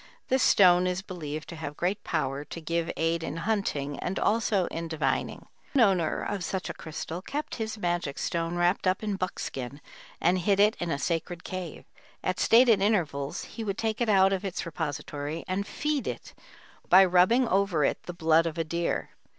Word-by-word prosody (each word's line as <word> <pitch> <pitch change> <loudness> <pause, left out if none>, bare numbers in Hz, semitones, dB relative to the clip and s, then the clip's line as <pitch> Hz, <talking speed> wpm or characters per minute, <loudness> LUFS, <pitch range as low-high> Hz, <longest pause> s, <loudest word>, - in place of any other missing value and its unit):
This 260 0 +3
stone 180 -2 +6
is 180 +1 -2
believed 155 -5 -6
to 170 - -7
have 150 -2 -6
great 185 +4 -1
power 140 -3 -2
to 165 - -8
give 165 +1 -2
aid 165 +1 +1
in 160 - -4
hunting 165 -7 -1
and 185 - -3
also 215 -4 +2
in 165 0 -4
divining. 160 -1 -2 0.3
One 265 -4 +5
owner 180 -5 +1
of 195 -3 -3
such 190 +2 -3
a - - -8
crystal 160 +2 -6
kept 290 +9 -4
his 220 0 -3
magic 175 -7 -2
stone 170 0 -2
wrapped 175 +2 +1
up 185 +3 +1
in 210 -2 -1
buckskin 140 -7 -4 0.4
and 180 +2 +2
hid 195 +2 +2
it 210 +1 +5
in 175 - -2
a 140 - 0
sacred 170 +3 -2
cave; 185 -4 -6 0.4
at 185 - -1
stated 230 -3 +5
intervals 160 -9 0
he 230 - -7
would 200 -2 -3
take 220 +1 -2
it 235 - +1
out 195 -1 +5
of 190 0 -2
its 195 -2 -3
repository 150 -1 -4
and 195 +2 -2
"feed" 300 -2 -2
it - - -6 0.6
by 190 +1 +8
rubbing 185 +8 +4
over 190 -7 +2
it - - 0
the 175 - -4
blood 165 0 +3
of 160 - -5
a 165 - +1
deer. 170 +2 -2
180 Hz, 190 wpm, -28 LUFS, 165-200 Hz, 0.6 s, by